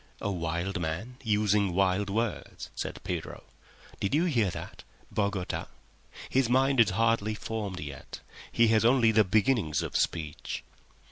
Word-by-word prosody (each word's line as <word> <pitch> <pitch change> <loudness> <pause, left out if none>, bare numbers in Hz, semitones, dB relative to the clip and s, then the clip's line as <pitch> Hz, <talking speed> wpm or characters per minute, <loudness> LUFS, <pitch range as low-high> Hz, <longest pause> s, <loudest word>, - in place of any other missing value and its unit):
"A 100 - -2
wild 85 +1 -2
man—using 105 +1 0
wild 100 +1 +2
words," 115 +3 -3
said - - -5
Pedro. - - -5 0.6
"Did 100 - 0
you 165 +4 +3
hear 120 - +2
that— - - -8 0.3
"Bogota? 100 -3 -2 0.6
His 130 -2 +2
mind 135 +1 +3
has 115 -3 +6
hardly 110 +1 +1
formed 105 -4 -4
yet. 75 -2 -8 0.3
He 115 -1 +4
has 110 -1 +4
only 120 -1 +5
the 110 0 +5
beginnings 100 - +2
of 80 - -5
speech." 80 -3 -2
105 Hz, 135 wpm, -29 LUFS, 90-115 Hz, 0.6 s, has